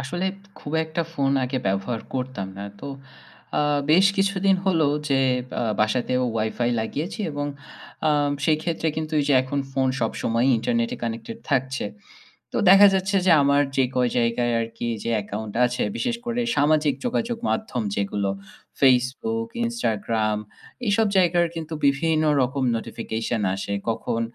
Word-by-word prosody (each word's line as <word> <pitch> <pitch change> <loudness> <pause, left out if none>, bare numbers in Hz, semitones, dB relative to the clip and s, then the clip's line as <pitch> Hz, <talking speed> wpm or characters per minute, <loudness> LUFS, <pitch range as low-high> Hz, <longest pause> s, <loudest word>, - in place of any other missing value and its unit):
আসলে 175 +7 -3 0.3
খুব 145 - -8
একটা 160 +2 -2
ফোন 135 -2 +1
আগে 130 +1 -2
ব্যবহার 100 +4 -1
করতাম 125 -7 -3
না। 100 - -5 0.2
তো - - -7 0.7
আ - - +3 0.3
বেশ 185 +5 +6
কিছুদিন 195 0 +2
হল 180 -4 +3 0.3
যে 135 -1 +3 0.4
আ - - 0 0.2
বাসাতেও 125 +3 +1
WiFi 115 +2 0
লাগিয়েছি 155 - -4
এবং 145 0 -3 0.6
আ - - +4 0.3
সেই 155 0 +4
ক্ষেত্রে 165 -1 -1
কিন্তু 155 0 -3
এই - - 0
যে 140 - +4
এখন 135 +2 -3
ফোন 135 -1 +1
সবসময় 115 +2 0
internet 115 0 0
এ - - -8
connected 120 - -4
থাকছে। 130 -2 0 0.7
তো - - -3
দেখা 195 +1 +9
যাচ্ছে 190 +1 +1
যে - - +5
আমার 140 +1 +4
যে 135 - +4
কয় 125 -1 +2
জায়গায় 120 +1 +1
আরকি 115 +1 -4
যে 115 - -2
অ্যাকাউন্ট 105 +1 -5
আছে 125 0 -2
বিশেষ 240 -1 -1
করে 240 0 -1 0.2
সামাজিক 150 0 +3
যোগাযোগ 235 -1 -1
মাধ্যম 175 - -2
যেগুলো 100 0 -1 0.5
Facebook, 135 - +2 0.2
Instagram 110 - -1 0.5
এসব 215 +2 +3
জায়গার 175 -2 +4
কিন্তু 160 -1 -5
বিভিন্ন 155 +3 +2 0.2
রকম 135 +2 -1
notification 115 0 -3
আসে। 100 +1 -4 0.2
কখন 115 0 -1
135 Hz, 150 wpm, -24 LUFS, 115-170 Hz, 0.7 s, দেখা